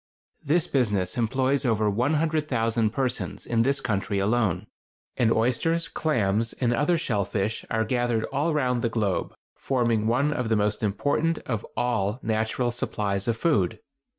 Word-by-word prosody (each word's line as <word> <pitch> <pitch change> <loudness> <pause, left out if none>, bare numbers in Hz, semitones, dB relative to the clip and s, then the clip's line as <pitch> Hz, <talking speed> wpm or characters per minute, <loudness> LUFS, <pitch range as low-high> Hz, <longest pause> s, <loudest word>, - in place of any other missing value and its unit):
This 160 +3 +2
business 105 - 0
employs 130 +3 +1
over 110 -4 +1
100,000 125 -2 +1
persons 125 +2 -3
in 115 -1 +1
this 135 +3 +2
country 105 -4 -1
alone; 100 -3 +1 0.5
and 115 -2 +2
oysters, 150 +9 +1
clams, 115 -8 0
and 120 -2 0
other 150 +7 +2
shell 110 -10 0
fish 100 +2 -2
are 110 0 0
gathered 120 -1 0
all 145 +5 +1
round 125 -5 +1
the 115 - +1
globe, 105 -5 -1 0.2
forming 115 -5 0
one 135 +6 +2
of 125 -6 -2
the 110 - +3
most 105 0 0
important 145 +10 0
of 115 -4 -2
all 110 -3 0
natural 110 +2 0
supplies 100 -4 -2
of 115 -1 +1
food. 105 - +1
115 Hz, 150 wpm, -26 LUFS, 110-135 Hz, 0.5 s, the